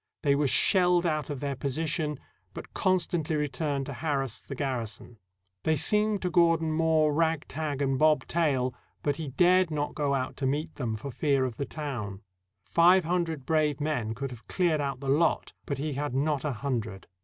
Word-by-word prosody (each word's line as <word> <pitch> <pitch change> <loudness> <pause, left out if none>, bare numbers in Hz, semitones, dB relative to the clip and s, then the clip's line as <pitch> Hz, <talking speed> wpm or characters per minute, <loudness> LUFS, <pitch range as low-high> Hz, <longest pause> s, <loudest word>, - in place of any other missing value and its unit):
They 140 -2 +4
were 145 0 +2
shelled 180 +3 +4
out 155 -3 -1
of 145 -3 -4
their 140 -1 -2
position, 150 +2 -2 0.4
but - - -9
constantly 175 -4 0
re 150 -1 0
turned 140 0 -2
to 140 - -6
harass 135 -4 -2
the 135 - -8
garrison. 120 -4 -4 0.4
They 160 - +2
seemed 210 +6 +2
to 180 - -1
Gordon 165 -2 +3
mere 160 -1 +3
rag 160 0 0
tag 145 -2 -3
and 135 -1 0
bob 155 0 +4
tail, 135 -7 0 0.3
but 145 -1 0
he 160 -2 -5
dared 180 +6 +3
not 150 -1 -2
go 145 -2 0
out 130 0 -2
to 135 - -1
meet 150 +4 -2
them, 115 -5 -3
for 135 +6 -6
fear 140 +1 +1
of 120 -3 -5
the 140 - -2
town. 115 -10 -5 0.4
Five 175 - +4
hundred 165 -5 -1
brave 155 -1 +1
men 125 -8 -1
could 135 +2 -4
have 120 -2 -11
cleared 170 -5 +1
out 135 -2 -3
the 140 - -5
lot, 155 +4 +1
but 140 - -2
he 150 +2 -3
had 140 -1 -3
not 145 0 0
a 150 - -1
hundred. 110 -6 -3
145 Hz, 190 wpm, -28 LUFS, 135-160 Hz, 0.4 s, They